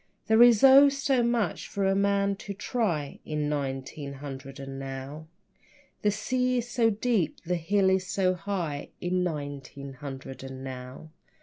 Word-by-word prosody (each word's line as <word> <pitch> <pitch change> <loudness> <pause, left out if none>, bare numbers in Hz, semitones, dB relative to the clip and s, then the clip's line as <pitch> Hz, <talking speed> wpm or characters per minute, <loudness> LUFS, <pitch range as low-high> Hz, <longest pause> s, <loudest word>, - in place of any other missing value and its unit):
There 220 +1 +4
is 240 -2 +7
oh, 275 +1 +9
so 275 -2 +1
much 235 -2 0
for 200 -1 -2
a 195 - +3
man 200 0 +2
to 200 0 -7
try 180 - -2
In 150 -1 -2
nineteen 140 0 -4
hundred 135 -1 -8
and 135 0 -7
now. 135 +3 -7 0.7
The 210 - +3
sea 250 +4 0
is 240 -1 -2
so 240 -2 +2
deep 215 -4 0
and 175 - -6
the - - +3
hill 190 +2 +2
so 185 0 0
high 175 -6 -4
In 180 +1 0
nineteen 140 -4 -5
hundred 135 0 -8
and 130 0 -8
now. 130 +3 -8
175 Hz, 160 wpm, -28 LUFS, 140-210 Hz, 0.7 s, oh